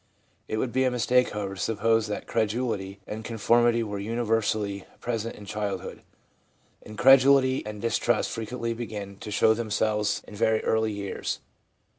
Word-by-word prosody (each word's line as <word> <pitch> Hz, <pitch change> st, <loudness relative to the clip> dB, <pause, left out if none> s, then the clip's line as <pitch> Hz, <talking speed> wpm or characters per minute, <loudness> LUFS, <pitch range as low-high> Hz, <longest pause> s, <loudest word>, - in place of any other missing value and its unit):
It 110 Hz, -, -2 dB
would 120 Hz, +2 st, -1 dB
be 130 Hz, +2 st, +2 dB
a 130 Hz, -, +3 dB
mistake, 125 Hz, +1 st, +2 dB
however, 100 Hz, -2 st, -4 dB
to 95 Hz, -, -7 dB
suppose 115 Hz, 0 st, +1 dB
that 105 Hz, -, -4 dB
credulity 110 Hz, -3 st, -1 dB
and 110 Hz, +1 st, -6 dB
conformity 115 Hz, +1 st, +2 dB
were 105 Hz, -2 st, -4 dB
universally 110 Hz, -2 st, -1 dB, 0.2 s
present 115 Hz, -1 st, -3 dB
in 105 Hz, -, -11 dB
childhood; 105 Hz, 0 st, -4 dB, 0.8 s
incredulity 130 Hz, +3 st, +5 dB
and 105 Hz, -1 st, -6 dB
distrust 115 Hz, +1 st, +1 dB
frequently 115 Hz, +1 st, -3 dB
begin 105 Hz, -4 st, -6 dB
to 105 Hz, -, -8 dB
show 110 Hz, +1 st, +4 dB
themselves 110 Hz, -2 st, 0 dB
in -, -, -11 dB
very 110 Hz, +1 st, +1 dB
early 110 Hz, 0 st, +1 dB
years. 100 Hz, -2 st, -4 dB
110 Hz, 145 wpm, -26 LUFS, 105-120 Hz, 0.8 s, incredulity